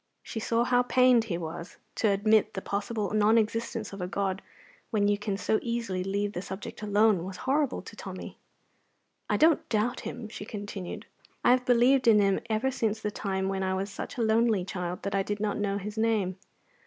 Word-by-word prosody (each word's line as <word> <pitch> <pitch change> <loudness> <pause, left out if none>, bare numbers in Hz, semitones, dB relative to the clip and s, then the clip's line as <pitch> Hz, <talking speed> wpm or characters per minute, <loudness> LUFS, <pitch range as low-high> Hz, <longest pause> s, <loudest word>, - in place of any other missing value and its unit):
She 225 - -5
saw 230 +1 +1
how 245 0 +3
pained 250 -2 +4
he 180 -6 -2
was. 170 +1 -7 0.2
To 225 - +2
admit 215 +2 +3
the 190 - -3
possible 205 +1 -2
non 215 +1 +4
existence 225 -1 -1
of 195 - -7
a 180 - -2
God 190 +1 -2 0.5
when 205 -3 +2
you 205 - +3
can 205 -1 -3
so 205 +3 +1
easily 230 -6 -2
leave 200 +2 -1
the 175 - -3
subject 190 +2 -7
alone 210 -3 +3
was 190 0 -6
horrible 275 0 +1
to - - -11
Tommy. - - -8 0.9
"I - - +2
don't 320 +1 +3
doubt 220 +2 0
Him," 240 -3 -6
she 215 - -8
continued. 205 -3 -6 0.4
"I - - +7
have 250 0 +3
believed 250 +1 +4
in 215 -2 +7
Him 195 -1 +3
ever 225 +5 +1
since 220 -4 -1
the 210 -1 -3
time 190 -2 -2
when 195 0 -1
I 190 0 0
was 195 +2 -3
such 200 - -7
a 235 - +1
lonely 220 -3 +2
child 180 -2 -4
that 200 - -3
I 195 - +2
did 205 +1 -3
not 210 -1 -1
know 200 -1 0
His 210 +2 -5
name. 210 -5 +1
210 Hz, 205 wpm, -28 LUFS, 195-230 Hz, 0.9 s, I